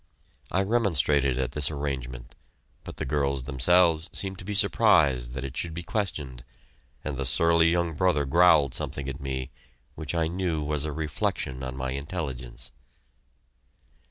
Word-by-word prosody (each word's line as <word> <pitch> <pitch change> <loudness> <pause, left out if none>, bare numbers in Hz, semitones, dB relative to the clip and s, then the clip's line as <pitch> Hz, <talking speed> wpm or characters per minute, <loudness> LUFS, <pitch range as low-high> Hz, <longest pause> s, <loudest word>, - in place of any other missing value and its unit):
I 95 - +2
remonstrated 75 - +2
at 65 -1 -1
this 75 0 +3
arrangement, 65 -5 -5 0.5
but - - -9
the - - -3
girls 70 -1 0
themselves 80 +5 +3
seemed 95 -1 -3
to - - -8
be 100 +2 -4
surprised 80 - +3
that 65 0 -5
it 70 0 -7
should 80 +1 -2
be 85 - -5
questioned, 75 - -3 0.6
and 75 -3 -4
the 70 - -2
surly 85 +4 +4
young 85 -1 +1
brother 80 -3 +1
growled 75 -3 +5
something 70 -1 -4
at 70 +1 -5
me 65 -1 -4 0.4
which 80 +1 -5
I 85 -1 +2
knew 85 -2 -2
was 75 0 -2
a 75 - -3
reflection 70 -4 -3
on 65 0 -5
my 65 0 -3
intelligence. 70 -5 -5
75 Hz, 155 wpm, -27 LUFS, 65-85 Hz, 0.6 s, growled